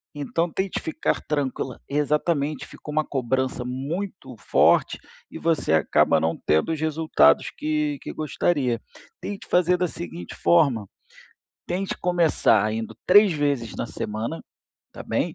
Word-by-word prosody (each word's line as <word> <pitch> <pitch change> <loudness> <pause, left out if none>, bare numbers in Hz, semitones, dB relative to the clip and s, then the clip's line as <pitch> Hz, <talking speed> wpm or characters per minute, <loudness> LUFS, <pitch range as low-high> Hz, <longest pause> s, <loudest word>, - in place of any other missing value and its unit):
Então, 165 +4 -1
tente 190 +2 -2
ficar 160 - -1
tranquila 135 -3 -2
exatamente. 150 0 0
Fica - - -13
uma 155 +1 +1
cobrança 130 -1 -1
muito 150 +11 -5
forte - - +3 0.3
e - - -7
você 160 - +1
acaba 80 - +3
não 80 +1 0
tendo 80 - +2
os 160 - -2
resultados 155 - +3
que 150 -1 -1
que - - -7
gostaria. 145 -5 0 0.4
Tente 200 -1 -6
fazer 180 0 +3
da 180 0 0
seguinte 170 +1 -8
forma: 135 - +3 0.8
tente 185 +2 -3
começar 160 - +2
indo 110 -1 -5
3 205 0 +7
vezes 140 -7 -1
na - - -3
semana, 110 +9 -4 0.5
tá - - -8
bem. - - -1
150 Hz, 135 wpm, -24 LUFS, 125-170 Hz, 0.8 s, 3